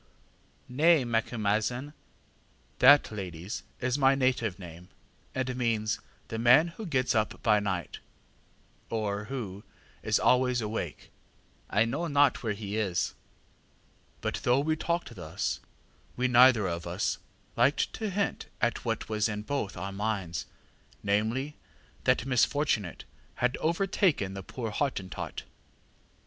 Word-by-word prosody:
ŌĆÖ 125 - -10
ŌĆ£ŌĆśNay, 160 -2 +5
MacumazahnŌĆÖ 115 +4 0 0.9
(that, 145 -4 +7
ladies, 95 -2 -5 0.2
is 130 +3 0
my 135 0 +5
native 125 -7 +1
name, 90 -1 -11 0.5
and 130 -1 -1
means 115 -4 0 0.3
the 110 - -3
man 125 +8 +6
who 195 +5 -8
ŌĆśgets 130 -5 +1
up 110 -2 -1
by 105 -2 +4
night, 95 -4 -3 0.9
ŌĆÖ - - -3
or 105 -1 -2
who 105 -6 -5 0.4
ŌĆśis - - +2
always 125 -1 +4
awakeŌĆÖ), 105 -8 -4 0.7
ŌĆśI 110 +3 +3
know 150 +8 -2
not 145 -3 +3
where 110 -3 -1
he 100 0 -4
is. 95 -5 0 1.1
ŌĆÖ - - 0
ŌĆ£But - - -5
though 125 +2 +3
we 155 +2 +1
talked 170 -4 -2
thus, 85 -6 -3 0.6
we 125 +1 +2
neither 125 -3 +6
of 85 0 -4
us 90 +4 -1 0.4
liked 140 - +2
to 220 -2 -3
hint 200 +1 -2
at 120 -1 0
what 115 -2 -2
was 110 0 0
in 105 0 -4
both 110 -6 -3
our 95 +3 -4
minds, 95 -5 -3 0.6
namely, 110 +9 0 0.5
that 125 -2 +3
misfortunate 125 - +1 0.3
had 125 +1 +1
overtaken 165 - +1
the 95 - -5
poor 115 +3 -5
Hottentot. 105 -7 -3
115 Hz, 135 wpm, -29 LUFS, 100-135 Hz, 1.1 s, that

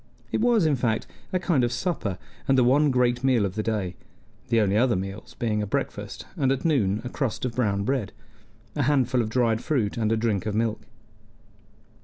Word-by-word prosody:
It - - 0
was, 230 -6 +4
in 150 -2 +3
fact, 115 -3 0 0.3
a 185 - +2
kind 170 -8 +1
of 120 - +1
supper, 120 - -2 0.3
and 135 -1 +4
the 125 - +5
one 145 +5 +4
great 125 -1 +2
meal 125 -6 +3
of 95 - -3
the 110 - -1
day: 105 -5 -2 0.5
the 115 -1 +3
only 100 -2 +2
other 120 +1 +3
meals 95 +3 -6
being 110 -3 0
a 105 - -2
breakfast, - - -3
and 135 -2 +1
at 135 +2 -1
noon 110 -10 +2
a 125 - -4
crust 130 -2 -2
of 125 - -2
brown 100 -5 0
bread, 120 -3 -1 0.6
a 145 - 0
handful 130 -3 +2
of 110 - -2
dried 115 -1 +1
fruit, 120 -8 0
and 110 -1 +1
drink 110 -3 0
of 105 - -1
milk. 110 0 0
120 Hz, 200 wpm, -25 LUFS, 105-130 Hz, 0.6 s, the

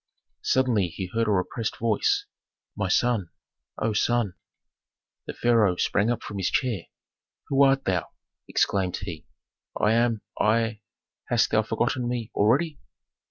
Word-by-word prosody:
Suddenly 120 -8 +2
he 90 +3 -5
heard 115 0 +1
a - - +2
repressed 105 +4 -1
voice, 405 - +1 0.5
"My - - -1
son! 115 -8 +1 0.5
O 110 0 0
son!" 115 -2 +1 0.9
The - - -4
pharaoh 115 -6 +3
sprang 105 +4 +1
up 120 - -1
from 100 -2 -6
his 95 - +1
chair. 115 -10 -1 0.6
"Who 140 0 +3
art 135 0 +4
thou?" 90 -3 0 0.4
exclaimed 95 -2 +1
he. 85 -6 -7 0.5
"I 105 - +3
am, 115 -2 +1 0.2
I 110 0 +1 0.5
Hast - - +2
thou - - +4
forgotten 125 -2 -1
me 120 -2 -3
already?" 140 +8 +2
115 Hz, 135 wpm, -26 LUFS, 100-120 Hz, 0.9 s, art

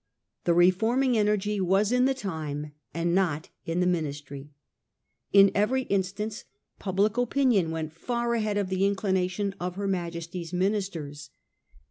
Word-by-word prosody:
The 170 - +3
reforming 225 +9 +3
energy 210 -1 +1
was 195 +4 +2
in 250 0 +4
the 270 0 +2
time, 155 - -4 0.2
and 170 +1 -1
not 170 -5 0 0.2
in 165 +2 0
the - - +3
Ministry. 145 -5 -3 0.8
In 200 0 +7
every 245 +6 +1
in 200 -5 +1
stance 205 +3 -5 0.4
public 200 +3 0
opinion 245 -7 +2
went 160 -1 -4
far 235 +6 -2
ahead 215 -3 0
of 200 -2 -1
the 190 0 -1
inclina 190 -2 +1
tions 200 +1 -2
of 180 0 -3
her 200 +1 -2
Majesty's 170 -1 -4
ministers. 180 -6 -2
190 Hz, 145 wpm, -27 LUFS, 170-210 Hz, 0.8 s, In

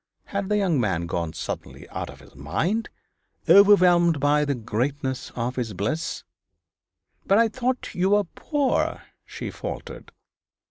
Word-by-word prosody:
Had 200 -1 -3
the 210 - +2
young 180 -8 +2
man 90 -6 0
gone 85 -1 -2
suddenly - - -6
out - - -5
of - - -12
his - - -17
mind, 155 - -2 0.6
overwhelmed 180 -5 +6
by 145 +1 +3
the 140 -1 0
greatness 130 +4 -2
of 125 +2 -3
his 115 -4 -2
bliss? 135 - -2 1.0
'But 195 - +5
I 230 0 +5
thought 250 +3 -2
you 185 +2 +1
were 205 0 +4
poor,' 280 - -1 0.2
she - - -6
faltered. - - -7
155 Hz, 140 wpm, -24 LUFS, 120-200 Hz, 1.0 s, overwhelmed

